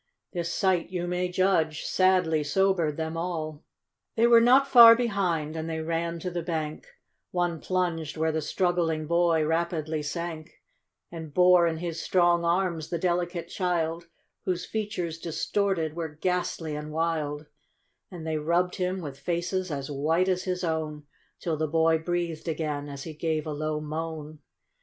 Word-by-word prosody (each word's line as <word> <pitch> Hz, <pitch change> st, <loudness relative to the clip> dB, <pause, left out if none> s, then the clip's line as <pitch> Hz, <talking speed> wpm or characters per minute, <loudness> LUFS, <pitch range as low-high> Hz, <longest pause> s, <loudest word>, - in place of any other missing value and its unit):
This 170 Hz, -2 st, -2 dB
sight, 185 Hz, -3 st, +1 dB
you 180 Hz, -1 st, -3 dB
may 180 Hz, +1 st, -1 dB
judge, 175 Hz, -4 st, +1 dB
sadly 180 Hz, -5 st, +2 dB
sobered 170 Hz, -1 st, +1 dB
them 160 Hz, 0 st, -3 dB
all. 160 Hz, -3 st, -4 dB, 0.5 s
They 230 Hz, -, +4 dB
were 235 Hz, -1 st, +7 dB
not 260 Hz, +4 st, +5 dB
far 235 Hz, -3 st, +10 dB
behind, 185 Hz, -10 st, -1 dB
and 160 Hz, 0 st, -4 dB
they 160 Hz, 0 st, -3 dB
ran 165 Hz, +1 st, -2 dB
to 180 Hz, -, -3 dB
the 175 Hz, 0 st, -2 dB
bank; 155 Hz, -2 st, -4 dB, 0.4 s
One 175 Hz, -2 st, -1 dB
plunged 170 Hz, -5 st, -1 dB
where 160 Hz, 0 st, +1 dB
the 160 Hz, 0 st, -1 dB
struggling 165 Hz, -1 st, 0 dB
hoy 170 Hz, -1 st, +3 dB
rapidly 160 Hz, -1 st, -1 dB
sank, 160 Hz, +1 st, -5 dB, 0.5 s
And 160 Hz, -3 st, -7 dB
bore 180 Hz, -1 st, +6 dB
in 160 Hz, -1 st, -1 dB
his 165 Hz, -1 st, -4 dB
strong 175 Hz, -2 st, +3 dB
arms 170 Hz, -2 st, 0 dB
the 170 Hz, -, -1 dB
delicate 175 Hz, 0 st, -1 dB
child, 170 Hz, -2 st, -1 dB, 0.4 s
Whose 180 Hz, -1 st, -1 dB
features 200 Hz, -7 st, -3 dB
distorted, 170 Hz, -1 st, -1 dB
were 165 Hz, -2 st, -3 dB
ghastly 165 Hz, 0 st, -2 dB
and 150 Hz, +1 st, -6 dB
wild; 155 Hz, -2 st, -1 dB, 0.6 s
And 175 Hz, -4 st, -8 dB
they 160 Hz, -1 st, -1 dB
rubbed 170 Hz, +4 st, +1 dB
him, 185 Hz, 0 st, -1 dB
with 140 Hz, -4 st, -7 dB
faces 175 Hz, +3 st, -2 dB
as 140 Hz, -1 st, -4 dB
white 160 Hz, +6 st, +1 dB
as 185 Hz, -1 st, 0 dB
his 180 Hz, -1 st, -2 dB
own, 155 Hz, -3 st, -2 dB, 0.3 s
Till 165 Hz, -3 st, -2 dB
the 155 Hz, +1 st, 0 dB
boy 160 Hz, +1 st, +3 dB
breathed 170 Hz, -1 st, -3 dB
again, 150 Hz, -3 st, -2 dB
as 140 Hz, -1 st, -7 dB
he 160 Hz, -, -7 dB
gave 155 Hz, 0 st, -2 dB
a 155 Hz, -, -4 dB
low 155 Hz, +1 st, -2 dB
moan. 155 Hz, 0 st, -5 dB
165 Hz, 160 wpm, -27 LUFS, 155-180 Hz, 0.6 s, far